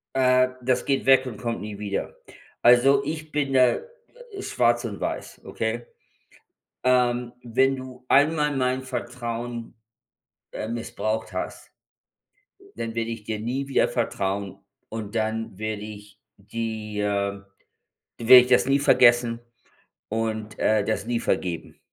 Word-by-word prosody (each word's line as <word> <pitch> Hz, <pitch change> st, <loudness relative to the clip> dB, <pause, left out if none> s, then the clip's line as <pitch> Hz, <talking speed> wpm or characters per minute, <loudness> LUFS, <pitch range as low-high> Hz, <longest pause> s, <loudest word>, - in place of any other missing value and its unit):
Äh, 130 Hz, -1 st, +4 dB
das 125 Hz, 0 st, +1 dB
geht 135 Hz, -1 st, 0 dB
weg 130 Hz, 0 st, +6 dB
und 115 Hz, -5 st, -6 dB
kommt 115 Hz, -2 st, -3 dB
nie 105 Hz, -1 st, -7 dB
wieder. 100 Hz, -2 st, -3 dB, 0.5 s
Also, 135 Hz, +3 st, +6 dB
ich 155 Hz, +1 st, -5 dB
bin 145 Hz, -2 st, 0 dB
da 125 Hz, -2 st, +4 dB, 0.6 s
schwarz 120 Hz, -, +1 dB
und 105 Hz, -3 st, -5 dB
weiß, -, -, -5 dB
okay? 115 Hz, +1 st, -3 dB, 1.0 s
Ähm, 125 Hz, -1 st, +2 dB
wenn 130 Hz, +3 st, +2 dB
du 130 Hz, -1 st, -10 dB
einmal 150 Hz, 0 st, +3 dB
mein 130 Hz, 0 st, 0 dB
Vertrauen, 120 Hz, -2 st, -5 dB, 0.8 s
äh, 110 Hz, -, -5 dB
missbraucht 110 Hz, -1 st, -3 dB
hast, -, -, -6 dB, 1.0 s
dann 115 Hz, 0 st, -4 dB
werde 115 Hz, 0 st, -2 dB
ich 115 Hz, -2 st, -6 dB
dir 110 Hz, -1 st, -3 dB
nie 130 Hz, +5 st, -3 dB
wieder 135 Hz, -, +2 dB
vertrauen 100 Hz, 0 st, -2 dB, 0.3 s
und 110 Hz, -2 st, -6 dB
dann 110 Hz, -3 st, -2 dB
werde 110 Hz, -1 st, -3 dB
ich 105 Hz, -1 st, -11 dB, 0.2 s
die 110 Hz, 0 st, -5 dB
äh, 100 Hz, -1 st, -1 dB, 0.8 s
dann 115 Hz, -, -6 dB
werde 130 Hz, 0 st, +11 dB
ich -, -, -5 dB
das 125 Hz, -1 st, +4 dB
nie 135 Hz, +1 st, +3 dB
vergessen 120 Hz, -4 st, +4 dB, 0.7 s
und, 110 Hz, -1 st, -3 dB
äh, 110 Hz, -1 st, +3 dB
das 110 Hz, -2 st, -1 dB
nie 120 Hz, -1 st, -1 dB
vergeben. 85 Hz, -3 st, -2 dB
120 Hz, 135 wpm, -25 LUFS, 110-130 Hz, 1.0 s, werde